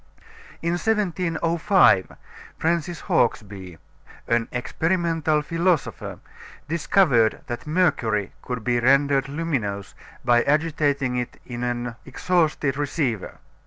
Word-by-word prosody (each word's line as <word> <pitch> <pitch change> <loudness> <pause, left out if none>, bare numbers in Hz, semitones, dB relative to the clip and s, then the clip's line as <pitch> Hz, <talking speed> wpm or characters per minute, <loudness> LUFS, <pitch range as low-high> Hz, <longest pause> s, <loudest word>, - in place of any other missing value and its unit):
In 170 - +1
1705 175 - +2 0.4
Francis 170 0 -1
Hawksbee, 95 -7 -1 0.5
an 115 -1 +1
experimental 160 +3 0
philosopher, 165 -2 -1 0.5
discovered 150 - +2
that 120 +4 -6
mercury 120 - +1
could 125 -3 -5
be 120 0 +1
rendered 135 +2 +3
luminous 135 - -3 0.3
by 120 0 +5
agitating 145 -4 +1
it 125 -1 -4
in 120 -1 -6
an 120 -1 -2
exhausted 150 -2 0
receiver. 140 - -2
145 Hz, 90 wpm, -23 LUFS, 120-165 Hz, 0.5 s, by